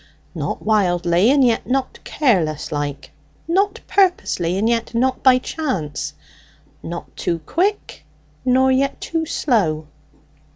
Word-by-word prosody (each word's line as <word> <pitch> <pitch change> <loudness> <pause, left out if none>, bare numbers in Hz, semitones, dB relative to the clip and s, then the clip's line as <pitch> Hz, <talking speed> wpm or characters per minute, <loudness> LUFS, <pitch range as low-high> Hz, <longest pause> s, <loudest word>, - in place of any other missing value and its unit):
"Not - - -4
wildly, 180 -2 +2
and 275 -1 +5
yet 235 -2 +1
not 265 0 -1
careless 180 - 0
like; 145 -1 -4 0.4
not 390 +4 +1
purposely, 270 - +1
and 210 +3 +1
yet 230 0 -1
not 255 +2 +1
by 260 -1 +6
chance; 255 - -3 0.7
not 170 +1 -7
too 170 - -1
quick 395 - -1 0.4
nor 260 +1 +3
yet 275 +2 +1
too 325 -1 -3
slow." 185 - 0
240 Hz, 120 wpm, -20 LUFS, 175-275 Hz, 0.7 s, by